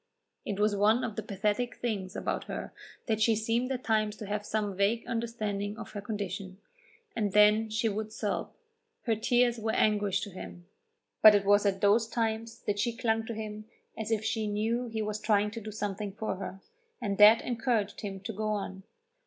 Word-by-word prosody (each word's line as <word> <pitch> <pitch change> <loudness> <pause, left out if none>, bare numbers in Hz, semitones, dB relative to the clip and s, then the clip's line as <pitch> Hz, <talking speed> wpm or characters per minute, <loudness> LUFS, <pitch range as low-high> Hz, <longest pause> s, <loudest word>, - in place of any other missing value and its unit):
It 200 -1 -3
was 210 0 +3
one 215 +5 +3
of 225 -4 -3
the - - -2
pathetic 210 +4 -1
things 200 -6 -3
about - - -2
her - - -6 0.3
that 220 -2 0
she 225 0 +4
seemed 230 +4 0
at 255 -1 -3
times 215 -2 +1
to 215 - -8
have 205 +1 -2
some 210 -2 -2
vague 200 +4 +1
understanding 215 -3 -3
of - - -8
her 205 - -5
condition, 200 -3 -5 0.6
and 205 -4 -1
then 210 +1 +5
she 220 +2 0
would 215 +1 -3
sob. 215 -2 -2 0.5
Her 230 -2 +1
tears 240 +1 +2
were 220 0 -1
anguish 205 -2 +2
to 205 - -5
him, 175 -1 -9 0.6
but 215 -1 +10
it 200 -1 +2
was 205 +1 +5
at 195 -1 0
those 215 +3 +4
times 225 0 -2
that 205 0 -2
she 230 +2 0
clung 225 -2 0
to 230 - -4
him 215 -1 -6 0.3
as 220 -1 -4
if 220 -1 0
she 220 -1 0
knew 225 +4 -1
he 220 -1 -3
was 215 0 -3
trying 210 -1 +2
to 230 +1 -6
do 215 - -7
something 205 -1 -4
for 215 -2 -3
her, 195 0 -7 0.4
and 200 -1 -2
that 215 +2 +8
encouraged 225 -4 -1
him 195 -3 -5
to 220 +3 -5
go 215 +2 -3
on. 195 -2 -3
215 Hz, 195 wpm, -30 LUFS, 205-225 Hz, 0.6 s, but